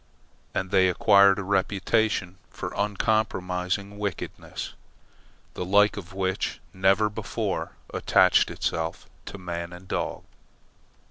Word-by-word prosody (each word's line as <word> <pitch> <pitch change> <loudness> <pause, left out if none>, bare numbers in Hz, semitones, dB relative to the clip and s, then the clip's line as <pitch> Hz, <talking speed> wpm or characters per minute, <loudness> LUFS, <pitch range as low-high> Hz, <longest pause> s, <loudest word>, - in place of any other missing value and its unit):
And 95 0 -2
they 95 -1 +5
acquired 100 +2 +5
a 100 - -3
reputation 95 0 0
for - - -6
uncompromising 100 -2 -1
wickedness, 100 -3 -5 0.8
the - - -4
like 105 +3 +4
of 95 -3 -8
which 95 0 -2
never 95 +3 +3
before 105 - -3 0.2
attached - - +4
itself 80 0 -3 0.2
to - - -7
man 85 -2 -5
and 90 +1 -11
dog. - - -3
95 Hz, 110 wpm, -26 LUFS, 90-100 Hz, 0.8 s, they